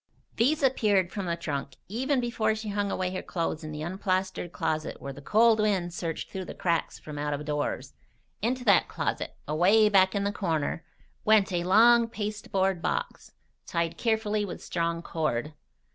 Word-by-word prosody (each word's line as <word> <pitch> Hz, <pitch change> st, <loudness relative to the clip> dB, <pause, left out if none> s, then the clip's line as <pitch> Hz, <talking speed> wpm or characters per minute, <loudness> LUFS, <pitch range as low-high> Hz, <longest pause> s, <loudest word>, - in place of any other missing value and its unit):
These 285 Hz, +6 st, +2 dB
appeared 205 Hz, -8 st, +3 dB
from 195 Hz, -3 st, -4 dB
the 170 Hz, -, 0 dB
trunk 145 Hz, -5 st, -4 dB
even 260 Hz, +7 st, 0 dB
before 225 Hz, -3 st, 0 dB
she 220 Hz, -1 st, -5 dB
hung 205 Hz, 0 st, -1 dB
away 185 Hz, -1 st, -2 dB
her 185 Hz, -, -3 dB
clothes 165 Hz, -2 st, -3 dB
in 155 Hz, -, -6 dB
the 150 Hz, 0 st, -5 dB
unplastered 185 Hz, 0 st, -2 dB
closet 155 Hz, -2 st, -2 dB
where 140 Hz, -, -6 dB
the 140 Hz, -, -11 dB
cold 220 Hz, +7 st, +4 dB
wind 190 Hz, -5 st, +1 dB
searched 165 Hz, -2 st, -4 dB
through 190 Hz, -1 st, -5 dB
the -, -, -8 dB
cracks 170 Hz, -2 st, -1 dB
from 150 Hz, -1 st, -8 dB
out 150 Hz, 0 st, -1 dB
of 150 Hz, +1 st, -7 dB
doors. 145 Hz, -3 st, -2 dB, 0.5 s
Into 250 Hz, +3 st, -1 dB
that 200 Hz, -5 st, +5 dB
closet, -, -, -3 dB
away 190 Hz, +8 st, +4 dB
back 190 Hz, -1 st, +4 dB
in 200 Hz, -, 0 dB
the 200 Hz, -, 0 dB
corner, 165 Hz, -6 st, -1 dB, 0.4 s
went 210 Hz, -3 st, +4 dB
a 175 Hz, -1 st, 0 dB
long 230 Hz, +5 st, +6 dB
pasteboard 200 Hz, -4 st, -1 dB
box, -, -, -3 dB, 0.3 s
tied 170 Hz, -1 st, -1 dB
carefully 220 Hz, -2 st, 0 dB
with 190 Hz, -4 st, -6 dB
strong 170 Hz, -1 st, -2 dB
cord. 150 Hz, -3 st, -2 dB
190 Hz, 175 wpm, -28 LUFS, 165-215 Hz, 0.5 s, long